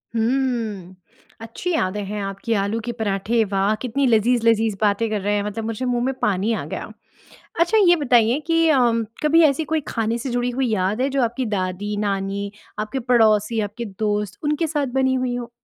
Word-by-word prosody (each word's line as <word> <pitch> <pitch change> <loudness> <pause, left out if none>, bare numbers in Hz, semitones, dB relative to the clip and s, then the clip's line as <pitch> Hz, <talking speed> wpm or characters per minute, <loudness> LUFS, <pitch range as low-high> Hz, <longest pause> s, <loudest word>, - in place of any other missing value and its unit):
हुँ। 225 -6 -1 0.5
अच्छी 230 +11 -4
यादें 205 -5 -1
हैं 210 +1 -4
आपकी 195 +4 -3
आलू 200 +3 -1
के 240 - -2
पराठे 220 +2 +1
वाह! 200 +1 +1
कितनी 260 +2 0
लज़ीज़-लज़ीज़ 225 -1 +3
बातें 210 +2 +2
कर 210 -2 -2
रहे 205 +2 0
हैं 205 - 0
मतलब 210 +2 -4
मुझे 225 +3 -3
मुँह 245 -1 0
में 265 - 0
पानी 210 +3 +1
आ - - -3
गया। - - -6 0.7
अच्छा 345 +6 +3
ये 350 - +7
बताइए 245 -4 +3
कि 330 0 +3
अ, 300 - +4 0.5
कभी 325 +2 +5
ऐसी 295 +1 +3
कोई 315 0 -1
खाने 225 0 -1
से 250 +3 -5
जुड़ी 245 0 0
हुई 255 +1 -1
याद 200 +4 0
है 270 - +1
जो 275 0 0
आपकी 240 +2 -1
दादी, 200 0 -2
नानी 200 0 -2 0.3
आपके 215 +5 -3
पड़ोसी, 225 -2 +3
आपके 215 +3 -4
दोस्त 210 -2 -1
उनके 300 +2 0
साथ 295 -3 -1
बनी 260 0 +2
हुई 255 -1 -1
हो? 240 -1 -5
225 Hz, 190 wpm, -22 LUFS, 205-255 Hz, 0.7 s, ये